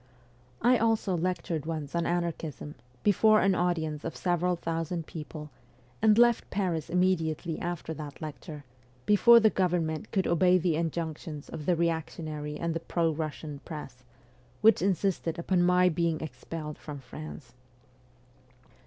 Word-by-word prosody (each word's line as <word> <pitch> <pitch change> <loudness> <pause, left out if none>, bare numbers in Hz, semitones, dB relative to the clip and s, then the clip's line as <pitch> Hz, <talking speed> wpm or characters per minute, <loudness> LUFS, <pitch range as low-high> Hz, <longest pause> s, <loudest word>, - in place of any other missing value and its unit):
I 245 +1 +5
also 225 -4 +1
lectured 170 -3 -2
once 155 -3 -4
on 170 -1 0
anarchism, 165 -4 -3 0.3
before 215 +1 +5
an 195 0 +3
audience 160 -4 -1
of 165 - -4
several 180 0 +1
thousand 165 0 -3
people, 150 -1 -8 0.5
and 215 0 +5
left 240 -1 +4
Paris 180 -5 -1
immediately 170 -3 0
after 175 -2 -4
that 150 -2 -8
lecture, 150 -1 -8 0.4
before 235 +3 +7
the 220 -1 +4
government 175 -1 -1
could 190 -2 +1
obey 180 +2 +4
the 175 -2 +1
injunctions 160 -2 -4
of 150 - -7
the 180 - +4
reactionary 160 -2 -2
and 170 +1 -2
the 165 - -2
pro 165 0 0
Russian 155 -1 -5
press, 140 -6 -9 0.6
which 225 -4 +6
insisted 185 -3 0
upon 175 +1 +1
my 180 +1 +4
being 165 -2 0
expelled 150 +2 -7
from 150 -2 -7
France. 135 -1 -10
165 Hz, 135 wpm, -29 LUFS, 155-180 Hz, 0.6 s, before